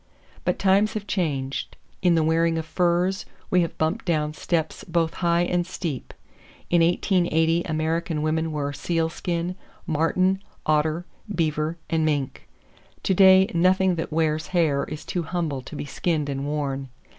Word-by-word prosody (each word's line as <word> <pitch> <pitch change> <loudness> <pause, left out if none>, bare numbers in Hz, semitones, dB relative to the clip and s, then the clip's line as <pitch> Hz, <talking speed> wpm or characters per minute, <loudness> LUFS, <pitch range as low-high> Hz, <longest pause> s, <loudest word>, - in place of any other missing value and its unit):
But - - +1
times 200 +2 +3
have 210 -2 -4
changed. 140 -9 -2 0.2
In 175 -2 +4
the 160 - +3
wearing 165 +1 +2
of 160 - -3
furs, 180 +3 +1 0.3
we 180 - +5
have 170 - -3
bumped 160 +8 0
down 155 -4 0
steps 160 0 -2
both 165 -1 0
high 170 0 +3
and 175 0 +1
steep. 170 -6 -5 0.6
In 175 -1 +5
1880 170 -1 +2
American 160 0 -1
women 160 +1 0
wore 145 -2 -2
sealskin, 170 +3 -2 0.3
marten, 185 +4 +1 0.2
otter, 155 +3 +1 0.3
beaver 155 -2 0
and 160 -1 +1
mink. 145 -4 -1 0.6
To 190 - +2
day 190 0 +7
nothing 185 +2 +3
that 165 -1 -3
wears 155 0 0
hair 145 -5 +2
is 150 - -7
too 180 - -2
humble 160 -5 -2
to 140 - -10
be - - -4
skinned 150 0 -1
and 140 0 -3
worn. 140 -2 -2
165 Hz, 150 wpm, -24 LUFS, 155-175 Hz, 0.6 s, day